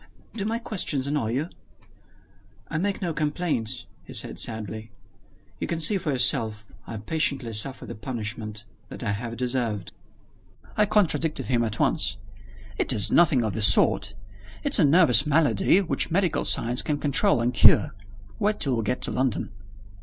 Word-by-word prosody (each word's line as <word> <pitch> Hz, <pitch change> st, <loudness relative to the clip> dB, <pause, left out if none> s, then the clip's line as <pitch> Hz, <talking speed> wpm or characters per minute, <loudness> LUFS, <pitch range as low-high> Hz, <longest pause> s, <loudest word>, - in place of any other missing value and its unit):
"Do 205 Hz, -3 st, -5 dB
my 225 Hz, +2 st, -2 dB
questions 180 Hz, -, -2 dB
annoy 140 Hz, -6 st, -2 dB
you?" 140 Hz, +6 st, -2 dB, 1.2 s
"I 160 Hz, -, -3 dB
make 200 Hz, +2 st, -3 dB
no 170 Hz, -2 st, -2 dB
complaint," 150 Hz, -6 st, -3 dB, 0.2 s
he -, -, -12 dB
said -, -, -2 dB
sadly. 110 Hz, 0 st, -3 dB, 0.7 s
"You -, -, -4 dB
can 170 Hz, -, -3 dB
see 190 Hz, +5 st, +2 dB
for 165 Hz, -5 st, -3 dB
yourself 110 Hz, -4 st, +2 dB, 0.2 s
I 110 Hz, -, -7 dB
patiently 130 Hz, 0 st, -2 dB
suffer 130 Hz, +5 st, -1 dB
the -, -, -8 dB
punishment 110 Hz, -2 st, -7 dB, 0.2 s
that -, -, -8 dB
I 105 Hz, -, -1 dB
have 115 Hz, +3 st, -6 dB
deserved." 120 Hz, -6 st, -3 dB, 0.8 s
I 210 Hz, 0 st, +2 dB
contradicted 165 Hz, -10 st, 0 dB
him 120 Hz, -2 st, +1 dB
at 110 Hz, -1 st, -2 dB
once. 100 Hz, +1 st, 0 dB, 0.6 s
"It -, -, +2 dB
is 105 Hz, -3 st, +5 dB
nothing 145 Hz, -8 st, +3 dB
of 110 Hz, -3 st, -3 dB
the 110 Hz, -, -4 dB
sort! 100 Hz, 0 st, +5 dB, 0.5 s
It's 285 Hz, -5 st, +4 dB
a -, -, +5 dB
nervous 145 Hz, -, +5 dB
malady, 160 Hz, +5 st, +2 dB
which 180 Hz, -, -2 dB
medical 175 Hz, -1 st, 0 dB
science 120 Hz, +2 st, +2 dB
can 150 Hz, -2 st, -2 dB
control 145 Hz, -, +1 dB
and 120 Hz, +2 st, -1 dB
cure. 115 Hz, -, +4 dB, 0.5 s
Wait 210 Hz, +1 st, -1 dB
till 130 Hz, -4 st, 0 dB
we 115 Hz, -, -2 dB
get 125 Hz, +4 st, -3 dB
to -, -, -3 dB
London." 130 Hz, -5 st, -2 dB
130 Hz, 160 wpm, -24 LUFS, 110-165 Hz, 1.2 s, is